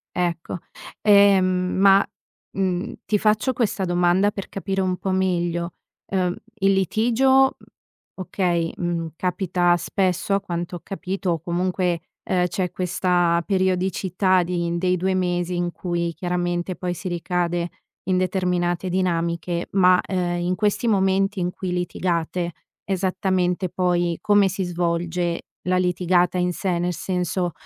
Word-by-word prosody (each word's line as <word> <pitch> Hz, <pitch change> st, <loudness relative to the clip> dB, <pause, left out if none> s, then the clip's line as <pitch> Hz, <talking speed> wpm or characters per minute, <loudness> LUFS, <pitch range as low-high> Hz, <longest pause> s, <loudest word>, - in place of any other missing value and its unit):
Ecco, 175 Hz, -1 st, -2 dB, 0.4 s
ehm, 200 Hz, -2 st, +6 dB
ma, 185 Hz, +2 st, +4 dB, 0.5 s
mhmm, 185 Hz, -2 st, -1 dB
ti 210 Hz, +1 st, +2 dB
faccio 215 Hz, +5 st, +2 dB
questa 220 Hz, -5 st, 0 dB
domanda 180 Hz, +3 st, +2 dB
per 195 Hz, -, -7 dB
capire 195 Hz, 0 st, -2 dB
un 185 Hz, -1 st, 0 dB
po' 190 Hz, -, -2 dB
meglio: 175 Hz, -2 st, 0 dB, 0.3 s
ehm, 180 Hz, -2 st, 0 dB, 0.2 s
il 195 Hz, -2 st, +3 dB
litigio, 240 Hz, +8 st, +3 dB, 0.6 s
okay, 175 Hz, -3 st, -1 dB
mhmm, 170 Hz, -1 st, -2 dB
capita 180 Hz, -1 st, +1 dB
spesso 185 Hz, +2 st, 0 dB
a 200 Hz, -, +2 dB
quanto 175 Hz, -2 st, -4 dB
ho -, -, -12 dB
capito 190 Hz, -1 st, -3 dB
o 165 Hz, -, 0 dB
comunque, 180 Hz, 0 st, -1 dB, 0.2 s
ehm, 180 Hz, -1 st, +1 dB
c'è 180 Hz, 0 st, -2 dB
questa 175 Hz, -1 st, +1 dB
periodicità 185 Hz, -1 st, +1 dB
di 170 Hz, -1 st, -1 dB
dei 180 Hz, +1 st, +1 dB
2 190 Hz, +2 st, 0 dB
mesi 180 Hz, -1 st, 0 dB
in 175 Hz, 0 st, -1 dB
cui 170 Hz, -1 st, -2 dB
chiaramente 175 Hz, +1 st, -2 dB
poi 180 Hz, 0 st, -3 dB
si 185 Hz, -, -6 dB
ricade 175 Hz, 0 st, -1 dB, 0.4 s
in 185 Hz, 0 st, +1 dB
determinate 180 Hz, -1 st, 0 dB
dinamiche, 170 Hz, -1 st, -1 dB
ma, 185 Hz, -1 st, +5 dB
ehm, 175 Hz, -2 st, -2 dB
in 180 Hz, +1 st, 0 dB
questi 210 Hz, +3 st, 0 dB
momenti 195 Hz, -1 st, +2 dB
in 180 Hz, 0 st, -1 dB
cui 185 Hz, 0 st, -5 dB
litigate 175 Hz, -1 st, -1 dB, 0.3 s
esattamente 185 Hz, -1 st, 0 dB
poi 175 Hz, -1 st, 0 dB
come 205 Hz, -1 st, +4 dB
si 190 Hz, +1 st, -2 dB
svolge 175 Hz, 0 st, -1 dB, 0.2 s
la 185 Hz, 0 st, +3 dB
litigata 180 Hz, 0 st, +2 dB
in 180 Hz, 0 st, +1 dB
sé, 175 Hz, +1 st, -1 dB
nel 175 Hz, +1 st, 0 dB
senso, 180 Hz, 0 st, -1 dB
180 Hz, 135 wpm, -23 LUFS, 175-190 Hz, 0.6 s, ehm